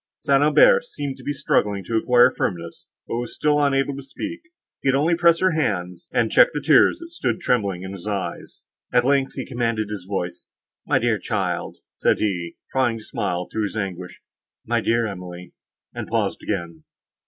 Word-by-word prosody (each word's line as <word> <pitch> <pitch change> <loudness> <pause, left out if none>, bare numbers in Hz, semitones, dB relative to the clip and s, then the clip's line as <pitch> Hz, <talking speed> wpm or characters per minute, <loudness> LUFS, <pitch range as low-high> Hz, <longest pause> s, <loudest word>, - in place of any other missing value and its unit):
St. 140 0 +2
Aubert 480 - +6
seemed 145 - -6
struggling 105 -8 0
to 115 - -3
acquire 125 +2 +5
firmness, 85 -3 -4 0.2
but - - -3
was 120 -1 -4
still 150 -1 +2
unable 135 0 +1
to 140 - -6
speak; 310 - -7 0.4
he 135 - +1
could 135 - +3
only 160 +5 +2
press 170 0 +4
her 185 0 +4
hand, 90 - -1
and - - +1
check - - +7
the - - -3
tears - - +5
that 335 0 -11
stood 340 - -1
trembling 100 - 0
in 95 - -6
his 100 0 -8
eyes. 95 -5 -5 0.3
At 125 0 +3
length 135 0 +2
he - - -4
commanded 115 -4 -2
his 95 -3 -6
voice, 90 -3 -4 0.4
"My - - +3
dear - - +1
child," - - -2 0.2
said - - +2
he, 90 -5 -2 0.2
trying 125 -3 +1
to 110 - -11
smile 90 -7 -3
through 110 - -3
his 105 +1 -3
anguish, 90 -3 -5 0.4
"my - - +1
dear 115 0 +1
Emily!"—and 90 -3 -9
paused - - -1
again. 85 -5 -4
115 Hz, 175 wpm, -23 LUFS, 95-140 Hz, 0.4 s, check